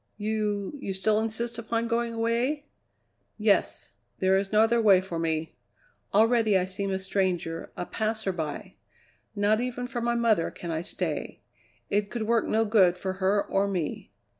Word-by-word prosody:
"You 210 -1 -2
you 195 - -3
still 210 +3 +1
insist 225 +2 -3
upon 230 0 -1
going 230 0 -1
away?" 240 +6 0 0.7
"Yes. 210 -2 +1 0.3
There 190 0 +3
is 195 0 0
no 215 0 +5
other 230 +1 +3
way 200 -4 +6
for 185 -3 -5
me. 160 -1 -2 0.6
Already 220 -1 +4
I 180 - +1
seem 195 +1 -3
a 190 - 0
stranger, 185 -4 -2
a 180 - -3
passerby. 195 -9 -3 0.6
Not 210 +2 +2
even 250 0 -3
for 245 -1 -4
my 235 0 +1
mother 225 -7 +2
can 170 - -7
I 160 0 -1
stay; - - -4 0.5
it 205 0 +1
could 235 -2 -3
work 230 +1 +1
no 225 +1 +2
good 190 -5 +4
for 190 +1 -3
her 200 +2 +2
or 195 +1 +1
me. 180 -6 -3
210 Hz, 165 wpm, -27 LUFS, 190-230 Hz, 0.7 s, way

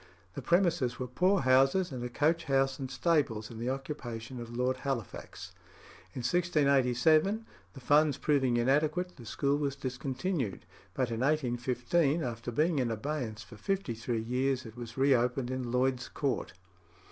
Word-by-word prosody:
The - - -5
premises 170 -9 +2
were 130 - -3
poor 180 +9 +2
houses, 135 +8 +3
and 125 -2 -5
a 125 - -3
coach 160 +7 +1
house 135 -1 +1
and 135 -1 -4
stables 135 -8 0
in 115 - -8
the 120 +2 -2
occupation 130 -3 -5
of 115 - -8
Lord 125 +1 +1
Halifax. 120 -9 -5 0.6
In 125 - -3
1687, 155 - +3 0.3
the 135 - -10
funds 145 +2 +3
proving 135 -5 +2
inadequate, 150 +9 +1
the 120 -4 -11
school 140 +5 0
was 140 -2 -1
discontinued; 130 - -3 0.3
but 130 -3 0
in 115 - -2
1815, 135 +3 +1
after 120 -1 -4
being 155 +5 +1
in 125 -2 +1
abeyance 115 -2 -3
for 115 - -13
fifty 190 - -2
three 115 0 -3
years, 130 +2 0
it 110 -1 -10
was 120 -1 -8
re 135 +1 +4
opened 125 +1 0
in 130 -2 -3
Lloyd's 125 0 +1
Court. 140 -3 -2
130 Hz, 160 wpm, -31 LUFS, 120-150 Hz, 0.6 s, re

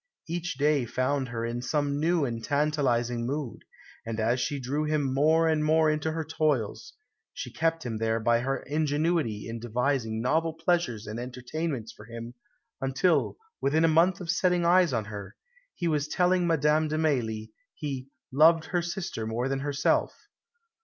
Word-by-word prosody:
Each 170 -2 -3
day 145 -2 +2
found 130 +3 -1
her 115 -1 -3
in 120 +1 -3
some 145 +2 0
new 165 -1 +2
and 115 -3 -4
tantalising 130 -5 +1
mood; 140 -2 -4 0.4
and 115 -1 -4
as 115 +3 +1
she 140 +4 -1
drew 140 +4 -1
him 150 -3 0
more 160 +4 +4
and 155 -1 +2
more 155 0 +4
into 155 +1 -1
her 160 -1 -3
toils, 155 - -1 0.4
she - - -6
kept 165 -1 0
him 115 -3 -3
there 115 0 +1
by 115 +1 +3
her 135 +3 -2
ingenuity 150 -5 0
in 115 0 -5
devising 120 -1 -1
novel 160 +7 +1
pleasures 165 -9 0
and 110 +2 -5
entertainments 125 0 -4
for 105 - -14
him, 115 +1 -8 0.5
until, 135 +4 +1 0.2
within 155 +4 +3
a - - +5
month 170 +3 +3
of 175 -2 -2
setting 180 -1 +2
eyes 175 -1 +5
on 110 -4 -1
her, 100 -1 -8 0.4
he 175 - -2
was 150 -2 0
telling 180 +1 +2
Madame 155 -1 +3
de 155 +1 -2
Mailly, 115 -8 -1 0.2
he 135 -3 -5 0.2
"loved 160 +4 +5
her 175 - +3
sister 170 - -4
more 115 +3 -1
than 135 0 -1
herself." 140 0 +1
145 Hz, 165 wpm, -28 LUFS, 120-160 Hz, 0.5 s, a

